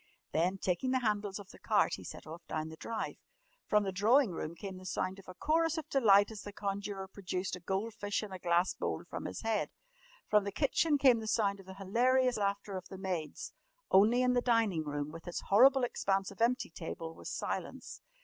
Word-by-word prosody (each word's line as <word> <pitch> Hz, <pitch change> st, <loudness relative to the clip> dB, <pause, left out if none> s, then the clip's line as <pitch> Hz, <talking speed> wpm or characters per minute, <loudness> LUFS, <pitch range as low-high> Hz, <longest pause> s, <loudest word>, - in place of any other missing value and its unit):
Then, 180 Hz, +4 st, +1 dB
taking 190 Hz, +7 st, -1 dB
the 260 Hz, 0 st, +1 dB
handles 205 Hz, -3 st, -1 dB
of 205 Hz, -1 st, -11 dB
the -, -, -15 dB
cart, -, -, +2 dB
he -, -, -11 dB
set -, -, -9 dB
off 165 Hz, +3 st, -8 dB
down 155 Hz, 0 st, -3 dB
the 160 Hz, -, -9 dB
drive. 225 Hz, +7 st, -4 dB, 0.5 s
From 210 Hz, 0 st, +3 dB
the 195 Hz, -, -2 dB
drawing 220 Hz, +5 st, +4 dB
room 165 Hz, -1 st, -5 dB
came 190 Hz, +1 st, -7 dB
the 185 Hz, -, -11 dB
sound 185 Hz, +2 st, -2 dB
of 195 Hz, -, -15 dB
a 185 Hz, -, -9 dB
chorus 325 Hz, -, +1 dB
of 315 Hz, -, -4 dB
delight 205 Hz, -6 st, +5 dB
as 215 Hz, -2 st, -7 dB
the 205 Hz, -, -8 dB
conjurer 200 Hz, -1 st, -4 dB
produced 185 Hz, -1 st, -4 dB
a -, -, -9 dB
goldfish 205 Hz, +3 st, -2 dB
in 210 Hz, -, -7 dB
a 185 Hz, -, -6 dB
glass 175 Hz, +1 st, +2 dB
bowl -, -, -3 dB
from -, -, -6 dB
his -, -, -5 dB
head. 225 Hz, -2 st, 0 dB, 0.6 s
From 210 Hz, -1 st, +4 dB
the 200 Hz, -, -3 dB
kitchen 290 Hz, +5 st, +2 dB
came 260 Hz, -4 st, +5 dB
the 220 Hz, -, -6 dB
sound 205 Hz, -2 st, +1 dB
of 190 Hz, -, -14 dB
the 190 Hz, -, -9 dB
hilarious 245 Hz, +6 st, +2 dB
laughter 200 Hz, -1 st, -1 dB
of 185 Hz, -, -8 dB
the 190 Hz, -, -9 dB
maids. 180 Hz, -5 st, -4 dB, 0.4 s
Only 225 Hz, +6 st, +5 dB
in 250 Hz, 0 st, +3 dB
the 245 Hz, -, +3 dB
dining 225 Hz, -10 st, +2 dB
room, 145 Hz, 0 st, -3 dB
with 165 Hz, +2 st, -11 dB
its 175 Hz, -, -3 dB
horrible 260 Hz, +6 st, +6 dB
expanse 195 Hz, -5 st, 0 dB
of 200 Hz, -, -11 dB
empty 240 Hz, -5 st, +2 dB
table, 165 Hz, 0 st, -6 dB
was -, -, -8 dB
silence. -, -, -4 dB
200 Hz, 215 wpm, -33 LUFS, 185-230 Hz, 0.6 s, horrible